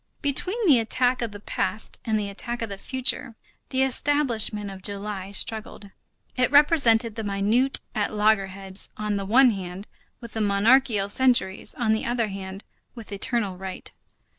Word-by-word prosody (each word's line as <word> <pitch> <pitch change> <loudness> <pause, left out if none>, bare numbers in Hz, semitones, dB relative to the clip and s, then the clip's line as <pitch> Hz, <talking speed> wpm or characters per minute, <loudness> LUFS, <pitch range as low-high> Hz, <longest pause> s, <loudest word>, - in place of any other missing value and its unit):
Between 370 - +1
the 280 -9 +6
attack 245 +3 +1
of 235 -2 -2
the 205 - -9
past 215 +1 -3
and 220 -1 0
the 205 - -3
attack 235 +4 -4
of 225 - -4
the 200 -1 -7
future, 255 -2 -1 0.3
the 260 0 +1
establishment 245 -7 0
of 190 -1 -10
July 200 -1 -5
struggled. 205 -1 -4 0.4
It 250 0 +2
represented 265 -6 +4
the 225 - -5
minute 210 +6 +1
at 210 -3 -1
loggerheads 195 -2 0
on 210 -1 -2
the 195 -1 -4
one 250 +4 +6
hand 190 -1 -6 0.3
with 235 -2 -10
the 220 - -2
monarchical 210 +1 +3
centuries, 245 -3 +2
on 225 -3 +1
the 220 - -1
other 235 -2 0
hand 195 0 -7 0.3
with 230 -3 -8
eternal 200 -1 -1
right. 190 0 -7
220 Hz, 160 wpm, -25 LUFS, 200-245 Hz, 0.4 s, the